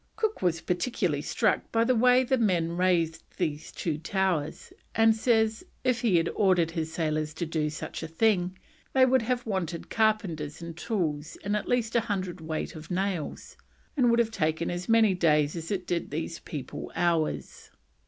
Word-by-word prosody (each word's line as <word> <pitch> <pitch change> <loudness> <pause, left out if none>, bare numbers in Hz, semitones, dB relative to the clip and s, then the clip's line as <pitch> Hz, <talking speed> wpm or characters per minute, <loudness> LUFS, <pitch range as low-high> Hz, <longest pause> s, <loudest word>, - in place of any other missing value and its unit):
Cook 440 -1 -1
was 165 -3 +1
particularly 180 - -1
struck - - 0
by 225 0 +3
the 255 +2 +3
way 250 +2 +5
the 260 0 +1
men 175 -7 +2
raised 170 -2 +1 0.2
these 155 -5 -2
two 155 -3 -3
towers, 170 -3 -1 0.2
and 225 0 +5
says 220 0 +2 0.2
if 250 -1 +1
he 225 -7 +3
had 165 0 +3
ordered 180 -5 +2
his 160 -1 -3
sailors 155 -1 -1
to 170 - -2
do 155 -1 -1
such 155 - -6
a 160 - -4
thing, 185 +1 +1 0.4
they 260 -1 +6
would 260 0 +3
have 245 +2 -1
wanted 185 -6 -3
carpenters 195 -10 0
and 170 -1 -7
tools 160 -6 -2
and 205 +1 0
at 210 - -3
least 240 -2 0
a - - +6
hundredweight 185 -7 -3
of 155 +1 -10
nails, 185 -3 -3 0.4
and 255 -4 +4
would 235 - +4
have 230 -1 +2
taken 160 -3 0
as 175 +3 -5
many 225 -3 +5
days 150 -4 +2
as 165 -1 -5
it 190 -3 -2
did 175 -1 -2
these 160 +3 -4
people 140 -5 -7
hours. 170 -3 -1
180 Hz, 175 wpm, -28 LUFS, 160-220 Hz, 0.4 s, they